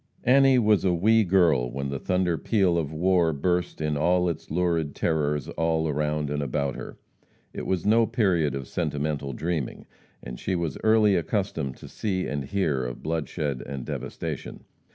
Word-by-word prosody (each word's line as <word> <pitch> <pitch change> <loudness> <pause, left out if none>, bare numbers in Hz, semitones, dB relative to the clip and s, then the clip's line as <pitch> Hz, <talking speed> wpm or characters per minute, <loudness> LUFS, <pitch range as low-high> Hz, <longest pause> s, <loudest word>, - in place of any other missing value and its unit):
Annie 135 +1 +5
was 105 -4 +3
a 90 -2 +2
"wee 110 +6 +4
girl" 85 -10 +3
when 70 +2 -4
the 70 -1 -3
thunder 90 -2 0
peal 95 -1 +1
of 80 -3 -1
war 85 +1 +2
burst 90 +5 -1
in 75 -1 -1
all 90 +4 +2
its 80 -1 -5
lurid 85 -3 0
terrors 75 -2 0
all 80 0 0
around 75 0 -1
and 75 0 -1
about 70 0 -1
her. - - -8 0.6
It - - -5
was 95 -3 -1
no 115 +2 +4
period 85 - +1
of 70 -1 -5
sentimental 75 -1 -2
dreaming, 80 0 -3 0.4
and 60 0 -7
she 95 - -1
was 85 -3 -3
early 110 -2 +4
accustomed 80 - -2
to - - -11
see 95 -4 -2
and 70 -2 -3
hear 75 -6 0
of - - -6
bloodshed 75 -3 -2
and 70 -2 -6
devastation. - - -5
80 Hz, 170 wpm, -26 LUFS, 70-95 Hz, 0.6 s, Annie